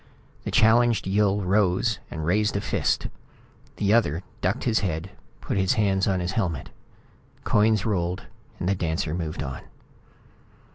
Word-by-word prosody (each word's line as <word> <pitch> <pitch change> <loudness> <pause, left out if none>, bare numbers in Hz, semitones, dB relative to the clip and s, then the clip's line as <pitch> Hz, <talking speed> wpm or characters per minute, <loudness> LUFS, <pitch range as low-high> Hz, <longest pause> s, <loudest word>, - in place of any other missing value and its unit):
The - - -2
challenged 115 -1 +4
Yill 100 +1 +2
rose 100 +2 +1
and 80 -1 -5
raised 105 +4 +1
a - - -2
fist. - - 0 0.7
The 100 0 +1
other 90 -7 +2 0.2
ducked 95 +7 0
his 115 -3 +2
head, 90 -1 -3 0.3
put - - -2
his 95 +2 +2
hands 100 -4 +1
on 95 -2 +1
his 90 +1 -2
helmet. 90 - -2 0.7
Coins 105 -1 +3
rolled. 90 -4 -1 0.4
The 90 +3 +1
dancer 80 -3 -2
moved 80 -3 -3
on. 65 -2 -6
95 Hz, 140 wpm, -25 LUFS, 90-105 Hz, 0.7 s, challenged